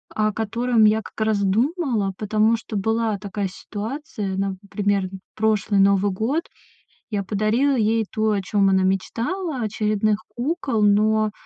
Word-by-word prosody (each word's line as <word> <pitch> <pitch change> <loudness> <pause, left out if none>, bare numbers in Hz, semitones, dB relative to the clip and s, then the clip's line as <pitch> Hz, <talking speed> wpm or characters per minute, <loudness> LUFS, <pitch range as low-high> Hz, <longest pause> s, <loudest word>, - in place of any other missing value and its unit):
о 215 0 +2
котором 225 +2 +1
я 215 +1 +4
как - - -12
раз 210 -2 +1
думала, 230 - 0
потому 215 +2 +2
что 225 -1 -5
была 220 +1 0
такая 200 0 -4
ситуация. 210 -1 -5
Например, 195 0 -1 0.3
прошлый 210 -2 +2
Новый 200 0 +3
год. 235 - -1 0.7
Я 205 -3 -2
подарила 215 +8 +1
ей 225 0 +2
то, 220 0 +1
о 205 -2 0
чём 200 +1 +1
она 190 -1 +3
мечтала, 245 - -1
очередных 215 -1 0 0.2
кукол, 260 -3 -1
но, 215 +1 +3
215 Hz, 135 wpm, -22 LUFS, 200-230 Hz, 0.7 s, я